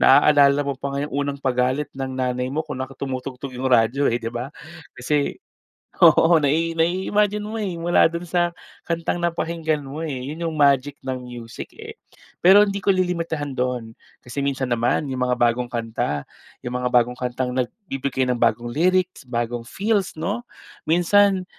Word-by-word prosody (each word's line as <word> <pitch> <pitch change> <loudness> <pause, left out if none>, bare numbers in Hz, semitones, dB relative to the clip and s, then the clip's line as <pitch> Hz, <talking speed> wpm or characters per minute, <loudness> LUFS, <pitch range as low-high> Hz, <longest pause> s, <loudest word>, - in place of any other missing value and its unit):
naaalala 145 0 +6
mo 140 - -1
pa 140 +2 -5
nga 145 - -1
yung 150 - -10
unang 140 0 -3
pagalit 130 +2 0
ng 135 -1 -4
nanay 125 0 -1
mo 155 +3 -2
kung 140 -4 -5
naka 130 +1 -8
tumutugtog 130 0 -5
yung 130 +1 -2
radyo 125 +4 +3
eh, 120 - 0
'di 115 -1 -5
ba? 125 +3 -4 0.5
Kasi 145 +3 0 0.6
oo, 165 0 +6
nai 160 +4 +1
nai-imagine 190 +5 +1
mo 220 +1 -4
eh, 190 -4 -3
mula 170 0 +4
dun 170 +1 -5
sa 175 0 +1 0.4
kantang 170 +1 -1
napakinggan 165 -3 -1
mo, 140 +3 -7
eh. 135 -6 -4
Yun 165 +1 -3
yung 160 - -5
magic 140 -1 +3
ng 130 -1 -3
music, 120 -3 -8
eh. - - -10 0.4
Pero 195 +4 +7
hindi 200 -1 -3
ko 195 - -4
lilimitahan 170 -6 0
doon, 125 -3 -2 0.3
kasi 125 +3 -5
minsan 135 -3 -1
naman 120 +5 +1
yung 130 - -3
mga 125 - +1
bagong 120 0 +1
kanta, 115 - -2 0.4
yung 125 0 -3
mga 125 - 0
bagong 125 0 +3
kantang 125 0 -2
nagbibigay 135 - -2
ng 125 -2 -1
bagong 120 +2 +1
lyrics, 180 -1 +1
bagong 120 -1 -3
feels, 200 -1 -1
'no? 205 +10 -3 0.4
Minsan 185 +3 +4
140 Hz, 170 wpm, -22 LUFS, 125-170 Hz, 0.6 s, Pero